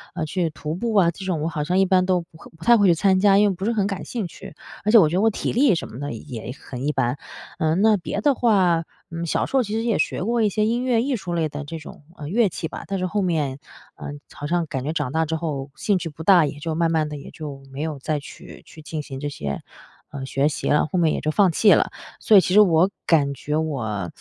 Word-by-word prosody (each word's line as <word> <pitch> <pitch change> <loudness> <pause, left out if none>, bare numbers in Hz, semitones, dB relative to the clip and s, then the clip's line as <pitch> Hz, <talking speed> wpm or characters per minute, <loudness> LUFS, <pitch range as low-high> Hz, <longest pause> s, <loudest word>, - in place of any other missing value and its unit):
呃， 160 - -2
去 170 +1 -1
徒 155 0 -5
步 225 +6 -2
啊。 180 -4 +5
这 190 - -10
种 180 -4 -1
我 - - 0
好 150 -2 -2
像 180 +5 0
一 195 - +4
般 185 -1 +3
都 180 -2 +2
不 165 -1 -17
会 - - -13
不 165 - -11
太 235 - +7
会 205 -4 +4
去 170 - +5
参 190 +2 +3
加， 195 0 +5
因 210 - +5
为 195 - +1
不 190 +3 -5
是 230 - +1
很 210 -4 +1
感 195 -2 -3
兴 230 -5 -4
趣， 160 - -12 0.3
而 210 - +1
且 235 - +8
我 180 -8 +7
觉 175 - -2
得 190 - +2
我 225 - +4
体 215 - -3
力 250 -4 +4
什 - - -4
么 120 - -10
的 145 0 -4
也 120 0 -7
很 130 +2 -6
一 - - +2
般。 135 -1 -1 0.4
呃， 160 0 +1
那 215 +4 +4
别 190 +2 -4
的 285 - +4
话， 190 -9 +2 0.3
嗯， 170 0 -4
小 - - 0
时 - - -11
候 265 - +5
其 215 -3 -4
实 225 +1 -1
也 230 -3 0
学 - - -1
过 235 +3 0
一 215 - +3
些 215 +2 0
音 235 +3 0
乐 245 -2 +2
艺 270 -1 0
术 180 -5 -5
类 165 -2 +1
的 145 0 -6
这 165 +3 -7
种， 155 - -11 0.2
呃， 145 - -7
乐 210 +4 +2
器 160 - -5
吧， - - -8
但 195 - -2
是 185 - -1
后 205 +2 -1
面， 150 -7 -1 0.4
呃， - - -8 0.3
好 145 - -7
像 170 +1 0
感 135 -3 -4
觉 155 +4 -2
长 150 -5 -2
大 160 +2 +1
之 160 +1 -2
后 145 -4 -4
兴 205 +2 +1
趣 170 -2 -4
不 155 +2 -9
大， 175 -2 +6
也 145 0 -5
就 160 +1 -3
慢 165 0 +1
慢 155 -2 +1
的 150 - -6
也 140 - -10
就 145 -3 -8
没 140 +2 -6
有 155 -2 -3
再 150 +2 -2
去 140 - -12
去 155 - -14
进 155 0 -5
行 135 -2 -8
这 145 - -3
些， 70 - -5 0.5
呃， 140 -2 -6
学 135 +1 +1
习 150 - -3
了， 150 - +3
后 185 - -1
面 160 -2 +3
也 - - -1
就 155 - 0
放 195 +1 +4
弃 205 +5 +5
了。 - - +2 0.3
所 215 -3 +5
以 - - +8
其 180 - -1
实 210 - +8
我 180 -2 +4 0.2
感 145 -4 +3
觉 150 +2 -3
我 110 - -3
165 Hz, 305 characters per minute, -23 LUFS, 150-200 Hz, 0.5 s, 且